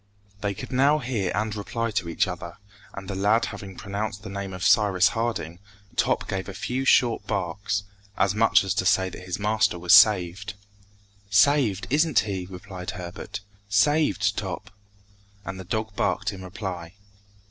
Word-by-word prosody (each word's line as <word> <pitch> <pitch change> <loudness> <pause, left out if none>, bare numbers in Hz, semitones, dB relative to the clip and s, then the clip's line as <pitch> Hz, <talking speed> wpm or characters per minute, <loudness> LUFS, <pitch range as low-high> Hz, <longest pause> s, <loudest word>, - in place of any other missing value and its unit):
They 100 -1 -2
could - - -8
now 140 +4 +4
hear 120 -9 -2
and 105 0 -1
reply 115 +2 -3
to 95 -5 -2
each 85 - +1
other, 90 -1 -6 0.4
and 100 -1 -7
the 100 - -4
lad 105 +4 +2
having 100 -3 -8
pronounced 100 0 -4
the 110 - -7
name 100 -1 -5
of 90 -1 -6
Cyrus 100 -3 +4
Harding, 110 -8 -3 0.4
Top - - +1
gave 95 +1 -3
a 95 - -7
few 130 +5 -2
short 120 -3 +3
barks, 100 +3 -2 0.3
as 100 0 +2
much 110 0 +4
as 95 -1 -1
to 95 -2 -1
say 95 0 +3
that 90 - -10
his 90 -1 -3
master 105 -3 +1
was 90 +3 +3
saved. 105 -1 +5 0.7
"Saved, 105 -2 +3
isn't 150 -3 +3
he?" 95 -4 -4
repeated 90 -1 -7
Herbert; 90 +2 -7 0.3
"saved, 105 -2 +2
Top?" 95 +1 -5 0.7
And 95 -1 -6
the - - -6
dog 110 +3 -3
barked - - 0
in 95 - -9
reply. 90 -2 -6
100 Hz, 165 wpm, -25 LUFS, 95-110 Hz, 0.7 s, saved